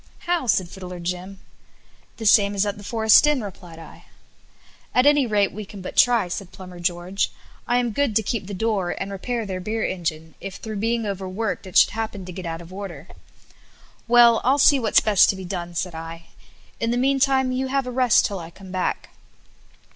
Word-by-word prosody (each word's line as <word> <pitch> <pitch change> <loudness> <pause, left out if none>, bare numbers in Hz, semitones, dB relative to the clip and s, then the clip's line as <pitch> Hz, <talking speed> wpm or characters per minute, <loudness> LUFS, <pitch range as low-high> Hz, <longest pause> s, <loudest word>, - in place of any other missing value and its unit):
"How?" 345 -6 0
said 195 -4 +2
Fiddler 180 -1 -9
Jim. 180 +2 -5 0.8
"The 225 - -6
same 205 -1 +5
as 200 +1 +2
at 205 0 -3
the - - -11
Forest 220 +5 +5
Inn," 290 -6 +1
replied 180 -4 -10
I. 165 - -13 0.9
"At 250 - +4
any 290 -3 +4
rate 205 -2 +2
we 215 - -7
can 200 0 -11
but - - -7
try," 240 -6 +4
said 180 +1 -6
Plumber 185 -2 -11
George; 175 +2 -1 0.4
"I 245 - +2
am 245 -1 0
good 280 -2 0
to 220 - +3
keep 205 -2 -3
the 200 - -5
door 200 -3 -1
and 195 +1 -4
repair 230 +4 -3
their 190 -2 -4
beer 215 +4 -2
engine, 160 -3 -4
if 195 -1 -6
through 215 -2 -6
being 230 +2 -1
overworked 195 +1 -3
it 185 - -1
should - - +6
happen 215 -3 -5
to 180 - -8
get 180 0 -7
out 165 0 -5
of 170 +2 -13
order." 185 -5 -8 1.0
"Well, 235 -1 +6
I'll 265 +3 +3
see 285 0 +5
what's 225 -4 +3
best 210 -3 +4
to - - +1
be 190 -1 -8
done," 175 -2 -5
said 175 +1 -2
I; 165 +1 -9 0.5
"in 230 - -1
the 240 - 0
meantime 265 0 +2
you 260 +1 -1
have 270 0 0
a 250 - -5
rest 250 -2 +3
till 200 -2 -3
I 165 -1 -8
come 190 +2 -13
back." 185 -1 -2
200 Hz, 205 wpm, -23 LUFS, 180-235 Hz, 1.0 s, should